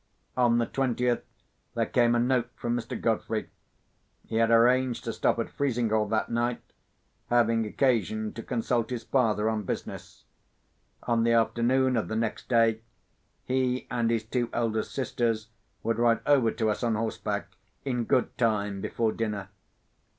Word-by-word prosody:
On 120 -2 +3
the 120 - +2
twentieth, 125 -2 0 0.5
there - - +1
came 120 -1 +3
a - - +3
note 125 0 +1
from 120 0 -2
Mr. 120 - -4
Godfrey. - - -1 0.7
He 110 - -3
had 115 0 +3
arranged 125 +2 +3
to - - -3
stop - - +1
at - - -3
Frizinghall 115 -6 +1
that 110 +2 -1
night, 120 +1 -1 0.7
having 115 -2 +3
occasion 110 -3 0
to 115 - -6
consult 120 -1 -1
his 120 -3 -4
father 110 -4 +1
on 110 -1 0
business. 100 - -6 0.8
On 115 -1 +1
the 115 0 +3
afternoon 125 +3 +2
of 115 - 0
the 110 - -3
next 115 0 -2
day, 115 -2 +3 0.6
he 130 -1 0
and 120 -2 +1
his 115 -1 0
two 120 +2 -2
eldest 110 -2 -1
sisters 115 -4 -1 0.3
would 115 0 0
ride 120 -1 +3
over 135 -6 +4
to 110 -1 0
us - - -4
on 115 -2 +1
horseback, 110 +1 -3 0.4
in 125 -3 -1
good 125 +1 +1
time 105 -4 0
before 115 +2 0
dinner. 105 -4 -3
115 Hz, 155 wpm, -28 LUFS, 110-125 Hz, 0.8 s, over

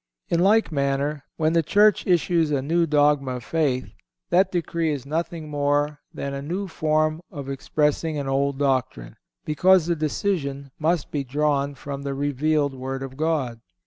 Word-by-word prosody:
In 170 - +2
like 205 +2 +4
manner, 140 0 -1
when 160 0 +1
the 165 - +4
Church 205 +6 +3
issues 170 -2 +2
a 140 -3 0
new 165 +3 +1
dogma 145 -3 +2
of 125 - -7
faith, 135 -3 -1 0.4
that 190 +2 +4
decree 170 -2 -1
is 140 -3 -4
nothing 160 +2 -3
more 145 0 0
than 140 0 -5
a 140 - -4
new 180 +7 -3
form 155 -1 0
of 140 -6 -7
expressing 150 +3 0
an 140 -1 -3
old 140 +1 0
doctrine, 130 - -1 0.3
because 180 +3 +4
the 170 0 +1
decision 145 -3 -2
must 160 0 0
be 145 -2 -1
drawn 140 +1 0
from 140 +1 -6
the 140 -1 -3
revealed 145 +1 0
Word 135 +1 -5
of 135 -1 -7
God. 145 -7 -1
150 Hz, 165 wpm, -24 LUFS, 140-165 Hz, 0.4 s, like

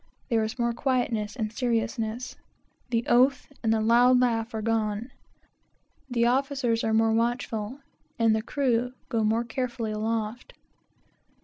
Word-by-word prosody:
There 225 -3 +2
is 220 +3 -4
more 235 -1 0
quietness 240 -4 -1
and 220 -4 -3
seriousness. 230 0 -2 0.5
The 235 -1 0
oath 255 +2 +3 0.2
and 225 - +1
the 225 - +3
loud 245 +3 +5
laugh 230 -2 +1
are 220 - -2
gone. 220 +1 -1 1.0
The 235 -2 +1
officers 255 -2 +1
are 220 - +1
more 225 0 +3
watchful, 235 +1 -1 0.4
and 225 -1 +3
the 220 - 0
crew 245 0 0 0.2
go 230 -3 0
more 220 +2 +2
carefully 240 -2 -3
aloft. 220 +2 -3
230 Hz, 135 wpm, -27 LUFS, 220-245 Hz, 1.0 s, loud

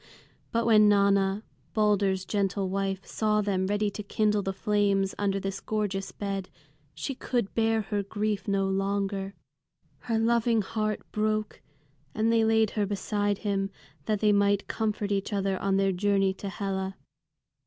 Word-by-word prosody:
But 230 0 +1
when 215 -2 +6
Nanna, 200 0 +3 0.3
Balder's 200 -3 +2
gentle 195 -1 0
wife, 195 0 -2
saw 215 -1 +1
them 190 -2 0
ready 205 +1 0
to 210 - -6
kindle 210 0 +1
the 195 - -2
flames 200 -1 +1
under 195 -1 +1
this 195 0 -4
gorgeous 205 -3 -2
bed, 195 -2 -4 0.5
she 275 - -3
could 245 -5 -2
bear 225 -1 +2
her 205 0 -1
grief 205 0 -2
no 195 -1 +1
longer. 195 0 -1 0.6
Her 230 -2 -1
loving 230 -1 +2
heart 215 +1 -2
broke, 215 0 -1 0.5
and 225 +1 +2
they 225 -1 +4
laid 220 -1 +3
her 205 -2 0
beside 205 0 -1
him, 195 -1 0 0.4
that 210 -2 0
they 210 -1 +4
might 200 0 +2
comfort 215 -2 -2
each 200 +2 -1
other 195 -2 0
on 195 0 +1
their 195 0 +2
journey 195 +1 +2
to 195 +1 -6
Hela. 190 0 -3
200 Hz, 155 wpm, -28 LUFS, 195-215 Hz, 0.6 s, when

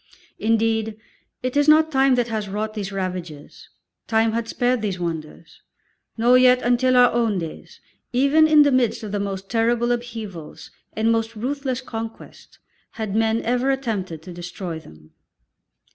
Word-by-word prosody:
Indeed 220 0 0 0.5
it 255 +1 -2
is 290 0 +3
not 315 +1 +5
time 270 -2 +4
that 245 -1 0
has 215 -3 -3
wrought 215 +2 -3
these 205 -2 -5
ravages 180 -6 -6 0.4
time 225 0 +2
had 230 0 -2
spared 245 0 0
these 195 -4 -3
wonders 165 -1 -6 0.6
nor 245 +3 +5
yet 255 0 +5
until 250 +1 +3
our 245 0 +6
own 230 -4 +1
days, 165 -3 -7 0.3
even 280 +5 +4
in 305 -1 +7
the 285 - +3
midst 245 -3 +1
of 210 - -5
the 205 - -1
most 195 -1 -4
terrible 235 +2 +1
upheavals 215 -10 -6 0.2
and 225 +1 +1
most 225 0 -1
ruthless 260 +2 -3
conquest, 225 -3 -9 0.4
had 215 -3 -4
men 225 +1 +1
ever 250 +3 0
attempted 205 - -2
to 180 - -9
destroy 175 -1 -6
them. 75 - -17
225 Hz, 155 wpm, -22 LUFS, 195-250 Hz, 0.6 s, in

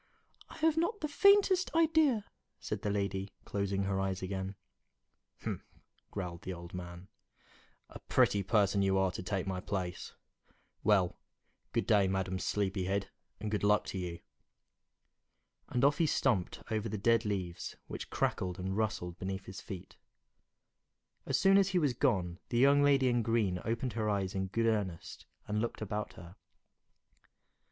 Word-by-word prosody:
"I - - -11
have 320 0 +2
not 345 +6 0
the 305 - 0
faintest 385 +2 +4
idea," 310 -9 +4 0.3
said - - -4
the 105 - -1
lady, 100 -1 -1 0.2
closing 100 -1 -1
her 95 0 0
eyes 95 -1 -2
again. 95 +1 -3 0.9
"Humph!" - - -3 0.5
growled 90 -4 -5
the 95 - -5
old 85 0 -10
man, 90 0 -7 0.8
"a - - -11
pretty 100 - +3
person 100 0 +2
you 95 0 +3
are 95 -1 +2
to - - -5
take 95 +1 -2
my 95 -1 -2
place! 95 -2 -4 0.7
Well, 95 -4 +3 0.5
good - - 0
day, 100 -3 +4
Madam 95 0 -1
Sleepyhead, 100 0 -1 0.3
and 105 +1 -4
good 105 - -1
luck 105 +1 +4
to 95 - -3
you!" 85 -2 -5 1.5
And 125 +2 +2
off 145 +1 +3
he 165 - +4
stumped 120 -12 +1
over 110 0 -1
the 105 - -3
dead 115 +3 +3
leaves, 95 -5 -3
which - - -7
crackled 90 -1 -1
and 95 +1 -3
rustled 90 -5 -2
beneath 95 +1 -4
his 95 0 -8
feet. 95 -5 -9 1.3
As - - +2
soon 195 +1 +6
as 195 -1 +3
he 185 - +1
was 145 -7 +2
gone, 95 -9 0
the 120 - 0
young 140 +3 +6
lady 140 -2 +4
in 120 -1 +2
green 110 -5 +1
opened 115 +1 -2
her 110 -1 -1
eyes 100 -2 0
in 95 0 -1
good 115 +5 0
earnest 100 -7 -2 0.2
and 105 +1 -1
looked 120 - -3
about 105 0 -3
her. 90 +1 -12
100 Hz, 160 wpm, -32 LUFS, 95-120 Hz, 1.5 s, soon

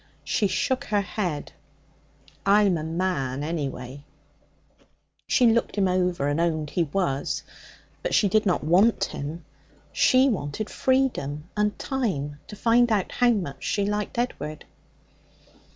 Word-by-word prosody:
She 205 - +1
shook 260 +7 -1
her 205 -1 +1
head. 180 -5 -3 0.9
'I'm 200 -2 +4
a 155 - -3
man, 160 -5 -2
anyway.' 140 -4 -4 1.2
She 250 - +3
looked 230 0 +2
him 200 -2 +2
over, 180 -5 +1
and 145 +3 0
owned 155 -3 -1
he 170 - +1
was. 145 -4 -1 0.6
But - - -1
she 205 - +4
did 215 +2 +3
not 185 -5 +1
want 185 +9 +4
him; 155 +4 -5 0.5
she 260 +1 +4
wanted 210 - -2
freedom 210 - 0
and 210 -1 0
time 160 - -2
to 210 - -9
find 235 +2 +3
out 205 -4 +1
how 245 0 +3
much 175 - -2
she 200 - 0
liked 210 +2 -2
Edward. 155 - -3
185 Hz, 135 wpm, -25 LUFS, 150-215 Hz, 1.2 s, I'm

